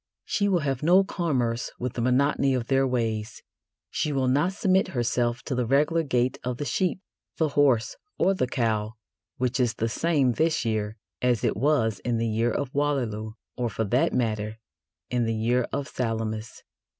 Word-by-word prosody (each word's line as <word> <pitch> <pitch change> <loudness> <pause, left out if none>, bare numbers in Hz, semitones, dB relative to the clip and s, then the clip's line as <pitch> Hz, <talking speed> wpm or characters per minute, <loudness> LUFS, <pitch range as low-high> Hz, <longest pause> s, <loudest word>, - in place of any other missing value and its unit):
She 200 -1 0
will 185 -4 +2
have 135 -4 -1
no 180 +5 +5
commerce 130 -12 -1
with 125 -1 -3
the 120 - -3
monotony 135 +2 +2
of 120 -2 -1
their 135 +1 +2
ways. 115 -4 -2 0.5
She 150 - -1
will 135 -2 +1
not 145 +8 +2
submit 190 0 +2
herself 120 0 0
to - - -3
the 125 -2 0
regular 150 +6 +3
gait 125 -4 0
of 125 -1 -3
the 145 - -3
sheep, 185 +4 0 0.4
the 160 -2 +2
horse, 140 -5 +2 0.2
or 195 - +3
the 130 -9 0
cow, 110 -3 -1 0.4
which 125 +1 -1
is 120 -2 +1
the 115 - -1
same 140 +2 +2
this 160 +1 +1
year 110 -1 -1 0.2
as 125 -2 +1
it - - +1
was 115 -6 +1
in 120 +4 -1
the 115 - 0
year 115 +1 +1
of 140 -2 -3
Waterloo, 120 -7 -1 0.2
or, 120 -2 -1
for 110 - -2
that 120 +5 +2
matter, 110 -3 -1 0.5
in 120 -1 +1
the 115 0 0
year 120 +3 +1
of 140 - -2
Salamis. 110 -2 -3
125 Hz, 180 wpm, -26 LUFS, 115-145 Hz, 0.5 s, no